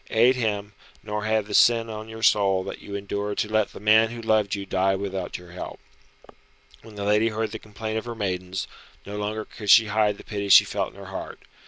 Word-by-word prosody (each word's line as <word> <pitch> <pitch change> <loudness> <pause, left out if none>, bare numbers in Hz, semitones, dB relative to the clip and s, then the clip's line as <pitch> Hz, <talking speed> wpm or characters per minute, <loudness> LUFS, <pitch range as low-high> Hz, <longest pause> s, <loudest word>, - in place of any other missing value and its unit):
Aid 120 +4 +4
him, 105 -4 -2 0.3
nor 105 0 -4
have 110 -1 +1
the 105 - -8
sin 115 -1 +5
on 110 0 -7
your 110 0 -8
soul 95 -3 +3
that - - -7
you 100 - -7
endured 100 +1 -3
to - - 0
let 110 -1 +1
the - - -10
man 110 +2 +5
who 120 0 -7
loved 110 -3 +1
you 100 -1 -5
die 95 0 +1
without 95 -2 -4
your 90 -1 -14
help." 90 - -8 1.0
When 110 -2 -14
the 100 - -5
lady 105 +2 +3
heard 110 0 -3
the 110 - -6
complaint 110 +1 -5
of - - -11
her 120 -1 -5
maidens, 95 -2 -3 0.4
no 100 - -7
longer 105 +1 -3
could 105 -2 -8
she 115 +2 +8
hide 105 -1 +2
the - - -12
pity 100 -2 -4
she - - +9
felt - - -2
in - - -21
her - - -10
heart. - - -7
105 Hz, 225 wpm, -25 LUFS, 100-110 Hz, 1.0 s, she